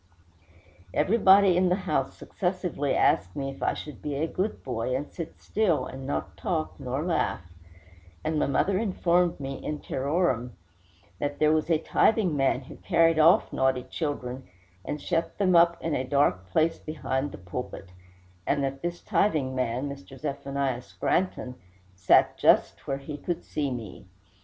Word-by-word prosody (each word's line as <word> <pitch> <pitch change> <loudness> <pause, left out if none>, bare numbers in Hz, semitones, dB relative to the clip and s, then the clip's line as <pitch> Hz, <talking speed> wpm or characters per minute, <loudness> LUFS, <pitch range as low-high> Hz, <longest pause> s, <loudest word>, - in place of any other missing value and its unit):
Everybody 195 +1 +5
in 180 0 +3
the 180 - +3
house 150 -6 -1
successively 180 -7 -2
asked 90 -1 +2
me 135 -1 -3
if 135 - -13
I - - +1
should 150 - -8
be 145 -1 -3
a 150 +3 0
good 190 +5 -3
boy, 125 0 -2
and 145 +3 -3
sit 165 -2 -8
still, 200 -7 +1
and 135 0 -8
not 140 - -3
talk, 160 -3 -3
nor 130 +4 -3
laugh; 90 - -1 0.7
and 155 0 0
my - - +1
mother 185 +8 +1
informed 180 -5 +1
me, 135 -1 -6
in 150 - -3
terrorem, 135 -5 -1 0.7
that 145 0 -2
there 155 0 +4
was 155 +1 +1
a 165 - +4
tithing 185 +1 +2
man, 135 -1 +2
who 130 - -12
carried 165 -1 +3
off 165 +3 +5
naughty 130 -1 +1
children, 130 -3 -4 0.4
and 150 - -4
shut 165 0 -2
them 185 -3 +3
up 170 0 +5
in 165 - -1
a 130 - 0
dark 125 -9 +1
place 160 - +1
behind 145 -2 -3
the - - -8
pulpit; 95 0 -7 0.6
and 140 -1 +1
that 135 0 -3
this 175 0 -4
tithing 150 -10 +1
man, 130 +1 -1
Mr. 140 -1 -9
Zephaniah 140 -3 -2
Scranton, 125 - -1 0.4
sat 90 0 +3
just - - +3
where 135 - -1
he 145 +2 -7
could 175 +3 -3
see 145 -2 -2
me. 110 -6 -7
145 Hz, 160 wpm, -27 LUFS, 130-170 Hz, 0.7 s, Everybody